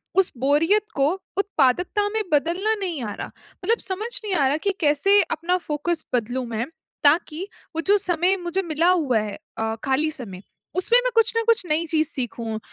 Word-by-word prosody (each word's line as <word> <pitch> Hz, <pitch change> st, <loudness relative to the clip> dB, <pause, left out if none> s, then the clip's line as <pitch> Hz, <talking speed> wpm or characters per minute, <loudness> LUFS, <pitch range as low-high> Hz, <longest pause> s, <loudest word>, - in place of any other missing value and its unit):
उस 385 Hz, -1 st, +4 dB
बोरियत 310 Hz, -, +3 dB
को 275 Hz, 0 st, +3 dB, 0.3 s
उत्पादकता 365 Hz, +2 st, +1 dB
में 440 Hz, -, +1 dB
बदलना 345 Hz, +9 st, +1 dB
नहीं 350 Hz, -8 st, -3 dB
आ 210 Hz, -2 st, -4 dB
रहा। -, -, -6 dB, 0.4 s
मतलब 460 Hz, +2 st, +4 dB
समझ 410 Hz, +4 st, -3 dB
नहीं 410 Hz, -3 st, -2 dB
आ 280 Hz, -5 st, +3 dB
रहा 285 Hz, -, +1 dB
कि 400 Hz, -, +3 dB
कैसे 325 Hz, +7 st, +4 dB
अपना 345 Hz, +3 st, 0 dB
फोकस 320 Hz, 0 st, -3 dB
बदलूँ 245 Hz, +2 st, -1 dB
मैं, 230 Hz, +1 st, -2 dB, 0.4 s
ताकि 310 Hz, +4 st, +2 dB, 0.3 s
वो 325 Hz, -, 0 dB
जो 410 Hz, +1 st, +6 dB
समय 360 Hz, 0 st, +2 dB
मुझे 350 Hz, +2 st, -1 dB
मिला 330 Hz, 0 st, +1 dB
हुआ 290 Hz, -11 st, +2 dB
है 210 Hz, -1 st, -4 dB, 0.2 s
अ, 225 Hz, 0 st, -1 dB
खाली 280 Hz, +4 st, +1 dB
समय, 205 Hz, -10 st, -7 dB, 0.3 s
उसमें 465 Hz, +7 st, +4 dB
मैं -, -, 0 dB
कुछ 455 Hz, 0 st, +4 dB
न 460 Hz, -, +2 dB
कुछ 455 Hz, -5 st, +3 dB
नई 315 Hz, +2 st, +2 dB
चीज़ 315 Hz, -2 st, +1 dB
सीखूँ। 230 Hz, -5 st, -4 dB
325 Hz, 185 wpm, -23 LUFS, 270-385 Hz, 0.4 s, जो